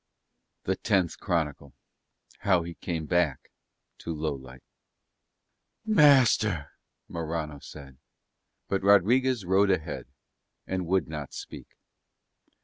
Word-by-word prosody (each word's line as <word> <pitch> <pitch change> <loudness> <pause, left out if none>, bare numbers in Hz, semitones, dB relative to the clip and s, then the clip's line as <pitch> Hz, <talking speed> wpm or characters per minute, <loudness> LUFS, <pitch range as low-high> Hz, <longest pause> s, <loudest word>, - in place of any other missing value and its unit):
THE 95 - 0
TENTH 95 -6 0
CHRONICLE 75 -7 -2 0.6
HOW 95 -4 +2
HE 85 0 -7
CAME 85 -2 -4
BACK 85 -4 0 0.5
TO 85 - -5
LOWLIGHT 65 -4 -5 1.2
"Master," 125 - +4 0.4
Morano 80 -3 -4
said. 70 -3 -12 0.7
But 95 - -1
Rodriguez 110 +4 +4
rode 95 +2 +3
ahead 85 -8 -2 0.6
and 95 -2 -3
would 95 -2 +1
not 75 -3 -7
speak. - - -9
85 Hz, 95 wpm, -27 LUFS, 75-100 Hz, 1.2 s, Master